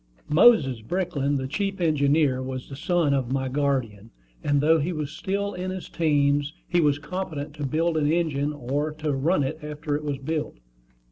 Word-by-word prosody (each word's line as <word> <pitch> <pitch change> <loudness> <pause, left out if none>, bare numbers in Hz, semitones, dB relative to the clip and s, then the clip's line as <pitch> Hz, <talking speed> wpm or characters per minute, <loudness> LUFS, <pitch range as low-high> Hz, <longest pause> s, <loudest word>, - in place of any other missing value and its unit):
Moses 150 - +5
Brickland, 145 - -1
the 130 - -3
chief 195 +6 -2
engineer, 145 -4 +2
was 130 0 -5
the 135 - -7
son 165 -1 +1
of 130 -3 -1
my 135 0 0
guardian; 130 -6 -1 0.3
and 145 -1 +2
though 160 +3 +4
he 155 +5 -1
was 155 -3 -4
still 200 +5 -2
in 180 +1 -4
his 185 -1 -6
teens, 145 -2 +1
he 175 -1 +2
was 145 -2 +3
competent 150 -2 -5
to 145 -2 -2
build 160 +3 +1
an 150 -1 +2
engine, 150 -4 0
or 145 +2 -2
to 155 -1 -2
run 145 +4 +2
it 155 +4 -3
after 150 0 -3
it 150 - -3
was 145 -2 -2
built. 150 - -3
150 Hz, 185 wpm, -25 LUFS, 140-165 Hz, 0.3 s, Moses